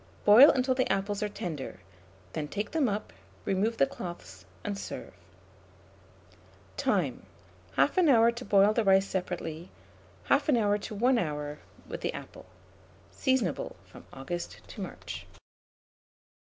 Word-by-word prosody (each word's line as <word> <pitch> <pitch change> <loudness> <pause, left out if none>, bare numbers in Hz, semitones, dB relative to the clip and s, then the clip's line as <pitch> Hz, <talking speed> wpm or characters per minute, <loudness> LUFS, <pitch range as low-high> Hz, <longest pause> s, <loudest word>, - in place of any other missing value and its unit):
Boil 225 +8 +10
until 260 0 +2
the 255 0 0
apples 200 +1 -1
are 210 - 0
tender; 160 - -6 0.5
then 150 -1 -3
take 205 +6 -4
them 300 -6 +2
up, 205 - -4 0.3
remove 210 +4 0
the 135 - +5
cloths, 95 - -9 0.2
and 205 - -2
serve. 200 - -7 1.6
Time. - - 0 0.5
1/2 360 -4 +4
hour 230 -3 +6
to 240 +1 -8
boil 200 -1 +4
the 230 - +1
rice 195 -1 +5
separately; 175 -3 -4 0.6
1/2 225 - +3
to 210 - -6
1 245 +4 +3
hour 150 -4 -3 0.3
with - - -6
the - - -2
apple. - - -10 0.6
Seasonable 255 - 0
from - - -14
August 170 +6 -6
to 210 - -8
March. 90 - -7
200 Hz, 130 wpm, -29 LUFS, 165-230 Hz, 1.6 s, Boil